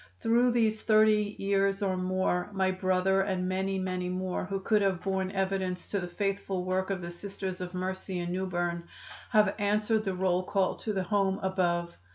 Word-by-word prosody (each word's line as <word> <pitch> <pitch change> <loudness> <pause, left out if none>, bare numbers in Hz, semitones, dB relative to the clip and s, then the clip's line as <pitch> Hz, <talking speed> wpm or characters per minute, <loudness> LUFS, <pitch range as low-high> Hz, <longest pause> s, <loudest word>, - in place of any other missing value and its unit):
"Through 240 +2 +3
these 220 -2 +2
thirty 215 -1 +4
years 195 0 +1
or 190 -1 +1
more 185 0 0
my 190 -1 +2
brother 185 +1 +2
and 190 -2 -1
many, 190 +1 -1
many 185 -1 -2
more 185 0 -2
who 195 +1 -3
could 210 +2 +2
have 190 -3 0
borne 190 -1 0
evidence 190 -1 -1
to 200 - 0
the 180 - -4
faithful 195 0 -2
work 185 +1 0
of 195 -2 -2
the 170 0 -5
Sisters 190 +1 -6
of 180 0 -5
Mercy 185 0 -3
in 175 0 -3
New 190 +1 -1
Berne 175 -1 -2 0.4
have 210 -2 +4
answered 210 +2 +1
the 190 -3 -2
roll 180 -1 +1
call 190 0 0
to 220 - -3
the 190 -2 -1
Home 195 0 +1
above. 175 -2 0
190 Hz, 190 wpm, -29 LUFS, 185-200 Hz, 0.4 s, thirty